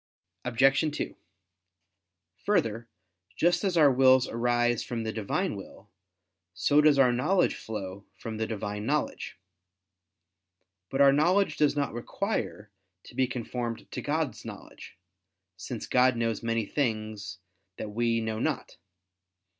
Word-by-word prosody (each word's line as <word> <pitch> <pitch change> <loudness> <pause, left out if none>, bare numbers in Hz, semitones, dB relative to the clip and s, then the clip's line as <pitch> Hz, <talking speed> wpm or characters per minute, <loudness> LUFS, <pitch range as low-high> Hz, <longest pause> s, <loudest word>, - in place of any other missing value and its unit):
Obj. 135 +5 +2
2: - - -4 1.3
Further, 120 - +1 0.5
just 175 +2 +2
as 190 -3 +1
our 150 -4 +7
wills 130 0 +5
arise 120 0 +1
from 120 -3 -4
the 110 0 -3
Divine 110 -3 -1
will, - - -12 0.6
so 145 +11 +4
does 150 -2 +5
our 130 -2 +5
knowledge 180 +11 +2
flow 100 -2 -7
from 110 -1 -6
the 110 0 -1
Divine 105 0 -4
knowledge. 150 +1 -2 1.5
But 135 - 0
our 140 -1 +7
knowledge 170 +3 +3
does 150 -1 +2
not 140 -4 -1
require 120 - -3 0.3
to - - -14
be 130 0 +2
conformed 120 -1 -5
to - - -4
God's - - -2
knowledge; - - -11 0.6
since 105 +5 -6
God 125 0 +3
knows 115 -2 -1
many 115 -1 -1
things 110 -5 -3 0.4
that 105 - -5
we 115 +1 +1
know 110 -1 -3
not. - - -2
120 Hz, 130 wpm, -28 LUFS, 110-140 Hz, 1.5 s, our